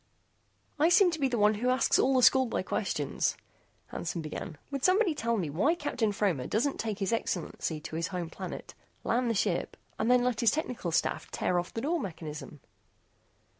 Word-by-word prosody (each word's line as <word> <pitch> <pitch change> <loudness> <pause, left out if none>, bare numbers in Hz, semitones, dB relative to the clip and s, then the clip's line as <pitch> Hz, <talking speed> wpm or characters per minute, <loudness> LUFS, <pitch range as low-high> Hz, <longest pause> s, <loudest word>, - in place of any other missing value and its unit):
"I 315 +3 +5
seem 365 0 +6
to 320 - -4
be 275 - +2
the 245 -2 -1
one 210 0 +4
who 235 +4 -1
asks 255 -1 +3
all 265 +1 +3
the 255 - +4
schoolboy 260 -5 +4
questions," 165 -7 -1 0.5
Hansen 170 -1 -4
began, 155 0 -6
"would 275 -1 -3
somebody 370 -1 +4
tell 230 -4 -1
me 180 -6 -1
why 245 - +2
Captain 250 -9 -1
Fromer 190 -11 0
doesn't 270 +6 0
take 220 -3 -2
His 200 +2 -1
Excellency 170 -6 -2
to 160 0 -7
his 165 +1 -1
home 175 -3 -4
planet, - - -7 0.3
land 245 +1 +1
the 230 - 0
ship, 195 -3 -1 0.2
and 220 - +1
then 250 0 +5
let 245 -2 0
his 235 - +5
technical 250 - -2
staff 165 - 0
tear 180 - 0
off 175 - -5
the 225 - -2
door 330 +6 0
mechanism?" 155 - -7
225 Hz, 190 wpm, -30 LUFS, 175-260 Hz, 0.5 s, seem